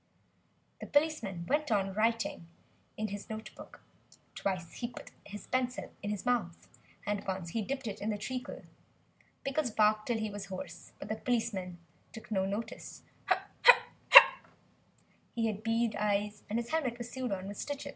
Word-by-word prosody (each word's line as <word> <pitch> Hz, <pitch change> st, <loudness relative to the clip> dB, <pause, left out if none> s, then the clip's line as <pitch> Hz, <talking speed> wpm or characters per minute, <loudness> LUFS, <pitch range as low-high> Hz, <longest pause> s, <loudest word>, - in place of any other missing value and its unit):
The -, -, -7 dB
policeman 290 Hz, -, +1 dB
went 300 Hz, 0 st, +1 dB
on 195 Hz, -2 st, +1 dB
writing 225 Hz, -4 st, 0 dB, 0.5 s
in 215 Hz, 0 st, -2 dB
his 205 Hz, +1 st, -7 dB
notebook; 220 Hz, 0 st, -9 dB, 0.5 s
twice 180 Hz, -4 st, -3 dB
he 240 Hz, -, -2 dB
put 240 Hz, -, -11 dB, 0.2 s
his 205 Hz, +1 st, -8 dB
pencil 255 Hz, -1 st, -2 dB
in 205 Hz, -, -3 dB
his 210 Hz, 0 st, -3 dB
mouth, 220 Hz, -9 st, -1 dB, 0.4 s
and 205 Hz, -1 st, -1 dB
once 185 Hz, -3 st, -3 dB
he 225 Hz, +6 st, -1 dB
dipped 265 Hz, +4 st, -4 dB
it 210 Hz, -3 st, -5 dB
in 210 Hz, -, -1 dB
the 210 Hz, -, -1 dB
treacle. 250 Hz, +4 st, -5 dB, 0.8 s
Pickles 275 Hz, 0 st, 0 dB
barked 215 Hz, -1 st, +2 dB
till 240 Hz, -2 st, +1 dB
he 220 Hz, -1 st, -2 dB
was 200 Hz, -1 st, -6 dB
hoarse. 185 Hz, -3 st, -8 dB
But -, -, -8 dB
still 215 Hz, -, -2 dB
the -, -, -19 dB
policeman 220 Hz, -7 st, -1 dB, 0.4 s
took 225 Hz, 0 st, -11 dB
no 190 Hz, -2 st, +1 dB
notice. 205 Hz, +4 st, -5 dB, 2.3 s
He 230 Hz, -1 st, +1 dB
had 215 Hz, -2 st, -2 dB
bead 225 Hz, 0 st, +1 dB
eyes, 205 Hz, 0 st, 0 dB
and 215 Hz, -, 0 dB
his 235 Hz, 0 st, -3 dB
helmet 275 Hz, -7 st, 0 dB
was 240 Hz, -1 st, -7 dB
sewed 255 Hz, -3 st, -3 dB
on 190 Hz, -1 st, -3 dB
with 205 Hz, -, -7 dB
stitches. 285 Hz, -1 st, -4 dB
215 Hz, 165 wpm, -32 LUFS, 200-240 Hz, 2.3 s, barked